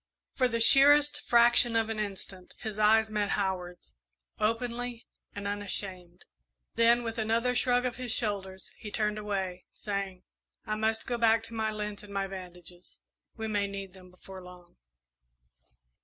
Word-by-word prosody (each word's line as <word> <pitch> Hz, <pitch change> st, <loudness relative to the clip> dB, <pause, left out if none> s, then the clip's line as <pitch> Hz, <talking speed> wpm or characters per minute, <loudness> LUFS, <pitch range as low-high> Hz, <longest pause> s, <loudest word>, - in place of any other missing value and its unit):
For 255 Hz, -, +2 dB
the 230 Hz, -1 st, -2 dB
sheerest 285 Hz, +5 st, +6 dB
fraction 240 Hz, 0 st, +5 dB
of 225 Hz, -1 st, +2 dB
an 220 Hz, -1 st, -3 dB
instant 195 Hz, -2 st, -6 dB
his 215 Hz, -1 st, -6 dB
eyes 220 Hz, +1 st, +4 dB
met 210 Hz, -1 st, 0 dB
Howard's, 185 Hz, -3 st, -4 dB, 0.5 s
openly 235 Hz, +2 st, -2 dB, 0.3 s
and 205 Hz, 0 st, -4 dB
unashamed; 190 Hz, -3 st, -5 dB, 0.5 s
then, 235 Hz, +1 st, +4 dB
with 230 Hz, 0 st, -4 dB
another 230 Hz, +3 st, +1 dB
shrug 245 Hz, 0 st, +2 dB
of 250 Hz, -, -2 dB
his 250 Hz, -2 st, -4 dB
shoulders, 195 Hz, -4 st, -3 dB
he 210 Hz, -, -7 dB
turned 210 Hz, 0 st, -1 dB
away, 190 Hz, -3 st, -4 dB
saying, 195 Hz, -3 st, -5 dB, 0.4 s
"I 215 Hz, -, -2 dB
must 220 Hz, +1 st, 0 dB
go 240 Hz, -1 st, -2 dB
back 225 Hz, -1 st, +4 dB
to 230 Hz, -, -7 dB
my 220 Hz, -1 st, -1 dB
lint 210 Hz, -1 st, -5 dB
and 210 Hz, -, -13 dB
my 195 Hz, -1 st, -1 dB
bandages 180 Hz, -2 st, -10 dB, 0.4 s
we 220 Hz, 0 st, -4 dB
may 205 Hz, -2 st, 0 dB
need 195 Hz, -2 st, -7 dB
them 185 Hz, -1 st, -15 dB
before 185 Hz, +1 st, -12 dB
long." 180 Hz, -1 st, -15 dB
210 Hz, 155 wpm, -29 LUFS, 190-230 Hz, 0.5 s, sheerest